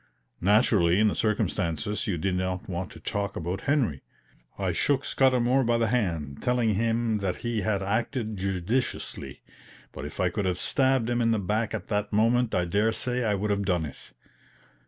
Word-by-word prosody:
Naturally 100 -3 +4
in 110 0 +5
the - - -2
circumstances 105 -2 -1
you 95 -5 0
did 95 +3 -1
not 90 0 -2
want 90 0 -4
to - - -11
talk 100 -1 -3
about 90 +4 -3
Henry." 120 - +1 0.6
I - - 0
shook 140 -1 +1
Scudamour 130 0 +3
by 120 -1 +2
the 115 -1 +1
hand, 85 - -1
telling 120 -3 +2
him 115 +1 0
that 95 -2 -1
he 115 -2 0
had 100 -2 0
acted 110 +2 -1
judiciously; 95 - -2 0.5
but - - -8
if - - -8
I 90 - +2
could 100 +2 -2
have 90 -1 0
stabbed 130 +2 +2
him 120 0 0
in 115 - +2
the 115 - +2
back 105 +3 -1
at - - -6
that 105 0 -1
moment 115 +2 +2
I 90 - +2
dare 105 +6 +2
say 125 +2 -1
I 105 -2 +1
would 105 +2 -1
have 100 0 +1
done 90 -4 0
it. 70 - -8
105 Hz, 185 wpm, -27 LUFS, 95-115 Hz, 0.6 s, in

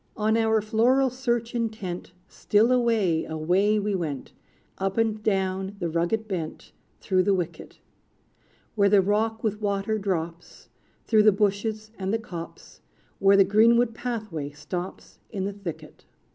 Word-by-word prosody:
On 220 +1 +2
our 220 -1 +2
floral 245 +5 +3
search 240 -2 -2
intent, 215 -7 -4 0.2
Still 215 +4 +2
away, 225 -10 +2
away 180 +7 +1
we 210 0 -1
went, 155 -8 -4 0.5
Up 195 +1 -2
and 220 -1 +1
down 190 -1 -1
the 170 -4 -3
rugged 175 +7 0
bent, 170 -6 -5 0.3
Through 185 -2 +1
the 200 +1 +2
wicket, 175 -3 -5 1.0
Where 200 -3 +3
the 205 0 +6
rock 215 +3 0
with 215 -1 -1
water 205 +1 -1
drops, 170 -4 -4 0.4
Through 220 -2 +4
the 215 0 +6
bushes 215 +2 -1
and 190 0 -2
the 225 - +2
copse, 175 -7 -9 0.4
Where 195 0 +5
the 195 - +8
greenwood 230 +4 +4
pathway 215 - -4
stops 175 +5 -7
In 195 -3 -4
the 200 +1 -2
thicket. 195 -5 -8
205 Hz, 145 wpm, -26 LUFS, 185-220 Hz, 1.0 s, the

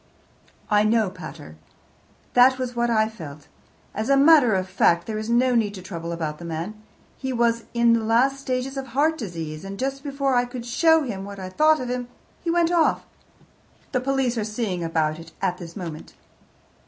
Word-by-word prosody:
"I 210 0 +5
know, 215 -2 +2
pater. 155 - -10 0.8
That 255 +1 +6
was 250 -1 -4
what 240 0 +1
I 220 -2 +3
felt. 155 -9 -10 0.5
As 220 +4 -3
a 275 - +5
matter 280 -6 +6
of 185 0 -1
fact, 170 -2 +2
there 215 -1 -3
is 215 +1 -5
no 250 +2 +3
need 215 -4 +1
to 185 - -8
trouble 170 -3 -6
about 155 -3 -4
the - - -9
man. 165 +5 -4 0.5
He 265 -1 -3
was 235 -1 +1
in 235 0 +4
the 230 -1 +1
last 250 +5 +2
stages 265 0 -3
of 270 0 -4
heart 315 +3 +3
disease, 165 - -6
and 195 0 -7
just 270 +3 -2
before 275 -2 -1
I 245 0 +3
could 245 -1 -7
show 320 +6 +4
him 205 -8 -5
what 200 0 -8
I 185 -1 -6
thought 310 +10 +3
of 250 - -4
him 250 -1 -3 0.4
he 340 - -2
went 340 0 +2
off. 335 -2 +2 0.9
The 255 - 0
police 260 -3 0
are - - -1
seeing 210 -5 -3
about 160 -1 0
it 165 0 -12
at 180 0 -1
this 170 -2 -9
moment." 165 -5 -7
230 Hz, 195 wpm, -24 LUFS, 185-260 Hz, 0.9 s, That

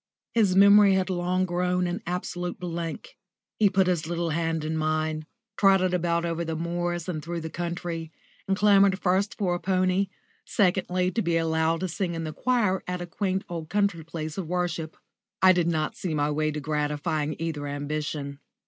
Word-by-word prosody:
His 205 -5 +3
memory 200 0 +7
had 190 0 0
long 180 +1 0
grown 180 0 0
an 175 +4 -3
absolute 180 0 -3
blank. 170 - -5 0.4
He 210 -2 +5
put 190 0 +3
his 175 -4 0
little 170 -1 -1
hand 165 -1 -1
in 160 +1 -2
mine, 155 0 -1 0.3
trotted 190 -2 +4
about 170 -1 +1
over 170 0 -2
the 160 -1 -3
moors 175 +1 -2
and 155 -4 -3
through 170 0 -4
the 160 0 -6
country, 170 -1 -4 0.4
and 195 0 +1
clamoured 200 -2 +5
first 195 +4 0
for 185 -4 0
a 175 - -2
pony, 185 +1 +1 0.4
secondly 185 -1 +1
to 230 - 0
be 170 -3 +1
allowed 160 0 +1
to 185 - 0
sing 175 0 -2
in 165 - -3
the 155 -1 -4
choir 215 -6 +1
at 180 0 -2
a 175 - -4
quaint 190 +2 -2
old 165 -2 -6
country 200 -4 +1
place 160 0 -5
of 180 - -4
worship. 170 -2 -2 0.4
I 185 - +7
did 175 -2 +2
not 155 -2 0
see 170 -4 -3
my 145 0 +1
way 155 +1 0
to 150 0 -3
gratifying 150 0 -1
either 155 -3 -3
ambition. 145 0 -4
175 Hz, 185 wpm, -26 LUFS, 160-185 Hz, 0.4 s, memory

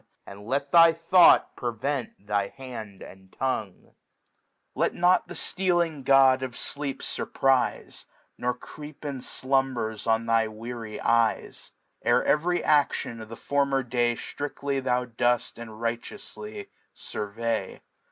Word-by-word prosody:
And 100 +1 -11
let 140 +2 -1
tky 165 -1 +7
Thought 170 +1 +5
prevent 120 -2 -3
thy 100 -1 0
Hand 110 -6 -9
aiidTongiiA^ 95 +2 -5 0.8
Let - - 0
not 180 +1 +3
the - - -8
ftealing 175 -6 0
God 135 -1 +5
of 130 -2 -5
Sleep 140 -2 -4
fuiprife^ 135 -2 0 0.2
> - - -41
Nor 125 0 0
creep 150 +4 -11
in 140 -3 -4
Slumbers 130 -5 -1
on 115 0 +2
thy 115 -1 +2
weary 110 0 -7
Ey^, 115 -1 0 0.3
Ere - - +3
tv^ry 175 +4 +2
A^on 140 -5 +1
of 110 - -10
the 115 - -7
former 140 -1 +1
Day 120 -1 +1
Striftly 140 +1 -4
tljou 125 -2 -1
doH 120 0 +1
and 115 - -7
righteouily 110 -2 -5 0.3
furvey. 115 +3 -4
125 Hz, 125 wpm, -26 LUFS, 115-140 Hz, 0.8 s, tky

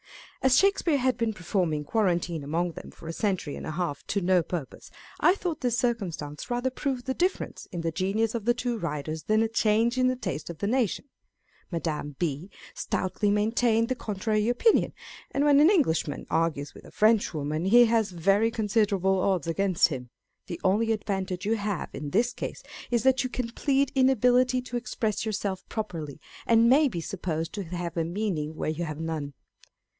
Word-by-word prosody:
As 265 -1 +4
Shakespeare 390 -6 +3
had 255 -2 +1
been 230 -2 -1
performing 175 -5 -1
quarantine 175 -4 0
among 170 +5 -1
them - - -10
for 165 - -13
a 165 - -4
century 185 -7 -1
and - - -7
a - - -3
half 160 -3 -3
to 200 - 0
no 180 0 +3
purpose, 165 -4 -6 0.3
I 360 - +5
thought 340 -6 -4
this 245 -2 0
circumstance 185 - -2
rather 245 +2 0
proved 260 -2 -3
the 260 - -1
difference 365 +6 -2
in 175 - -4
the 165 0 -1
genius 200 +6 0
of 230 -3 -3
the 240 0 +3
two 245 -2 -2
writers 155 -2 -3
than 215 +1 +3
a - - +1
change 225 +2 +2
in 255 - +4
the 255 - +1
taste 185 -11 -5
of 170 - -6
the 200 - -3
nation. 235 0 0 0.7
Madame 155 -4 -3
B. 165 +2 -2 0.2
stoutly 190 +2 -1
maintained 225 +2 +2
the - - +2
contrary 215 -2 -1
opinion: 430 - +3 0.4
and 280 +1 0
when 285 -1 +6
an 305 +3 +7
Englishman 260 - +1
argues 160 -3 0
with - - -14
a - - -12
Frenchwoman, 165 -8 +1
he 240 +5 +7
has 225 -2 +2
very 195 +5 +2
considerable 205 -4 +1
odds 185 -5 +1
against 185 +2 +2
him. 125 -5 -6 0.4
The 170 - -5
only 215 +4 +2
advantage 190 -3 -2
you 225 +2 +1
have 205 -2 -3
in 145 0 -5
this 235 +9 +1
case - - -6 0.3
is 235 -2 +1
that 265 0 +3
you 255 - -2
can 245 -2 -3
plead 275 +3 +1
inability 255 -1 +3
to 245 -1 -4
express 225 -3 -2
yourself 205 -3 -3
pro 220 - -1
perly, 160 -8 -7 0.3
and 230 0 +5
may 285 +5 +5
be 175 -10 -4
supposed 165 -3 -3
to 205 - -4
have 175 0 -5
a 165 - +1
meaning 165 -4 -2
where 155 - -2
you 165 +2 -3
have 155 -1 -6
none. 155 -4 -4
205 Hz, 190 wpm, -27 LUFS, 170-240 Hz, 0.7 s, an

